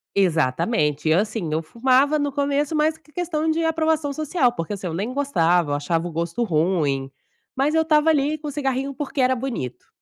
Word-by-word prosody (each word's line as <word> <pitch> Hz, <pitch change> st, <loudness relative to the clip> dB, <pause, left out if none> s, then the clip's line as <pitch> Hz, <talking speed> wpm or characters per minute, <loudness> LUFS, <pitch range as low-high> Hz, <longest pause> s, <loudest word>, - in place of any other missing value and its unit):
exatamente 155 Hz, -, +1 dB
e 155 Hz, -, +5 dB
assim 210 Hz, -1 st, -1 dB
eu 160 Hz, +1 st, 0 dB
fumava 260 Hz, -, +2 dB
no 285 Hz, -1 st, -1 dB
começo 285 Hz, +1 st, 0 dB
mais 310 Hz, +1 st, +2 dB
porque 310 Hz, -1 st, -25 dB
questão 320 Hz, -2 st, -1 dB
de 325 Hz, +1 st, 0 dB
aprovação 320 Hz, -2 st, +1 dB
social 290 Hz, -3 st, +1 dB
porque 165 Hz, -5 st, -4 dB
assim, 195 Hz, -2 st, -5 dB
eu 165 Hz, -, -3 dB
nem 205 Hz, +8 st, -3 dB
gostava 175 Hz, -, +1 dB
eu -, -, +2 dB
achava 165 Hz, +3 st, -1 dB
o -, -, -7 dB
gosto 170 Hz, +7 st, -2 dB
ruim, 155 Hz, -7 st, 0 dB, 0.4 s
mas 285 Hz, +4 st, +1 dB
eu 320 Hz, -, +4 dB
estava 315 Hz, 0 st, +3 dB
ali 300 Hz, +1 st, +1 dB
com 300 Hz, -, -6 dB
o -, -, -3 dB
cigarrinho 270 Hz, -1 st, -2 dB
porque 280 Hz, +1 st, -4 dB
era 255 Hz, 0 st, +3 dB
bonito. 235 Hz, -, -5 dB
260 Hz, 200 wpm, -22 LUFS, -, 0.4 s, e